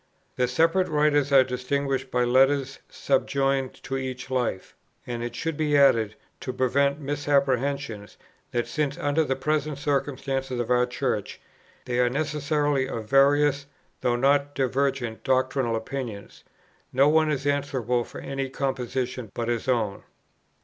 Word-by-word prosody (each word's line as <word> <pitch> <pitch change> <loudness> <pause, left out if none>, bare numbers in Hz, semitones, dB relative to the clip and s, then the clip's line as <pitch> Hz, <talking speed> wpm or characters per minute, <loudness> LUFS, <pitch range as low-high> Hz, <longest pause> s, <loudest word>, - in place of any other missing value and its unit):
The 125 - +1
separate 165 +8 +2
writers 150 -2 +2
are 135 -1 +7
distinguished 130 +2 -2
by 125 0 +1
letters 135 +2 +2
subjoined 135 -1 0
to 135 - -3
each 130 0 -5
Life: 125 -7 -2 0.3
and 120 -1 -4
it 120 0 -5
should 165 +3 -2
be 150 -1 +1
added, 115 -6 +4 0.2
to 130 - -4
prevent 140 +3 +1
misapprehension, 140 -5 0 0.4
that, 120 -1 -1
since 150 0 -2
under 155 -1 +1
the 135 -3 -1
present 150 +1 -1
circumstances 135 -3 -2
of 120 0 -2
our 125 0 +3
Church, 125 - -3 0.5
they 125 0 -1
are 125 0 +4
necessarily 145 -1 0
of 110 -4 -5
various, 140 +1 +4 0.3
though 120 -1 +1
not 140 +3 +2
divergent, 135 -3 -1
doctrinal 130 -2 +1
opinions, 110 -3 -6 0.5
no 135 +2 +4
one 155 +1 +4
is 140 -2 -2
answerable 130 -4 0
for - - -10
any 135 -1 -3
composition 130 -3 -3
but 120 0 -2
his 120 0 -2
own. 110 -6 0
135 Hz, 140 wpm, -25 LUFS, 125-145 Hz, 0.5 s, are